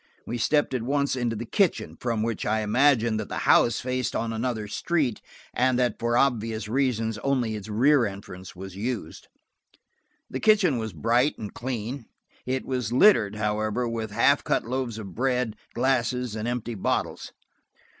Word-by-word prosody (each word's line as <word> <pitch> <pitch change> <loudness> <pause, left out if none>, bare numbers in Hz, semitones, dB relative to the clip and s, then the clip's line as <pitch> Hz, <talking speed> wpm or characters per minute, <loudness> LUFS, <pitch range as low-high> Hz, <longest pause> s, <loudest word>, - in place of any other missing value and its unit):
We 120 - -4
stepped 145 +4 +2
at 125 - -1
once 140 +3 0
into 120 -3 -1
the 115 +2 -5
kitchen, 195 - 0
from 115 -3 -2
which 115 -2 -2
I 110 +1 +1
imagined 115 0 +3
that 110 - -5
the - - -4
house 120 - +4
faced 125 -1 -2
on 115 0 -1
another 110 -2 -2
street, 135 +1 -1 0.3
and 130 0 +2
that 125 -1 0
for 120 0 +1
obvious 115 -5 0
reasons 115 -3 0
only 125 -4 0
its 105 0 -7
rear 125 +4 +4
entrance 95 -2 -9
was 95 0 -9
used. 115 +3 -4 1.0
The 130 - -5
kitchen 195 - +4
was 110 -1 -4
bright 115 - +1
and 105 -2 -7
clean; 120 0 -5 0.4
it 130 0 -1
was 125 -4 -2
littered, 120 - +5
however, 105 +3 -1
with 115 -1 -3
half 105 - +3
cut - - 0
loaves 125 -2 -3
of 100 -4 -8
bread, 125 -1 0 0.2
glasses 125 -2 0
and 110 +1 -3
empty 120 -1 -3
bottles. 100 - -2
120 Hz, 165 wpm, -26 LUFS, 110-130 Hz, 1.0 s, littered